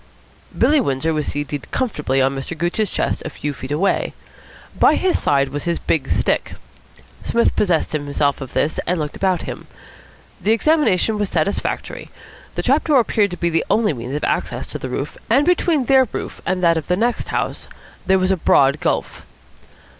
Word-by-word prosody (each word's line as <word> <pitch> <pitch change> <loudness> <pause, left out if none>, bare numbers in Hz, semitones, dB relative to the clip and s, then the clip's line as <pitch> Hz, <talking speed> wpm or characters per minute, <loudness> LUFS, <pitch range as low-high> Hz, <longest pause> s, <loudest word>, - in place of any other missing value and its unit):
Billy 295 -1 +4
Windsor 155 - 0
was 150 -1 -2
seated 145 -1 -4
comfortably 150 - 0
on 135 +1 +1
Mr. 135 +5 -5
Gooch's 175 +5 0
chest - - -1
a - - -4
few 145 0 -4
feet 130 -1 -8
away. 155 +7 0 0.6
By - - +6
his 370 -1 +1
side 140 -1 +2
was 145 +2 -4
his 170 -1 0
big 145 -5 -1
stick. - - 0 0.7
Psmith 235 - +1
possessed 180 -6 +1
himself 145 -1 -1
of 135 - -7
this, 155 - 0
and 180 0 0
looked 150 -1 -4
about 185 -2 0
him. - - -7 0.7
The 215 - +3
examination 225 - +2
was 205 -2 0
satisfactory. 175 +4 -2 0.5
The - - -2
trap - - +2
door 295 -4 +4
appeared 215 -3 +2
to 180 - -6
be 170 0 0
the 165 - +1
only 215 -6 +2
means 125 +2 -5
of 150 - -3
access - - -1
to - - -6
the - - -5
roof, - - -4
and 285 - +4
between 335 -5 +2
their 265 0 +5
roof - - -6
and 185 -1 0
that 170 -1 +4
of 160 - -4
the 180 - +1
next 235 +3 0
house - - -2 0.4
there 190 0 +5
was 185 0 +1
a 190 - +2
broad 140 -2 +3
gulf. - - -2
175 Hz, 185 wpm, -20 LUFS, 145-220 Hz, 0.7 s, By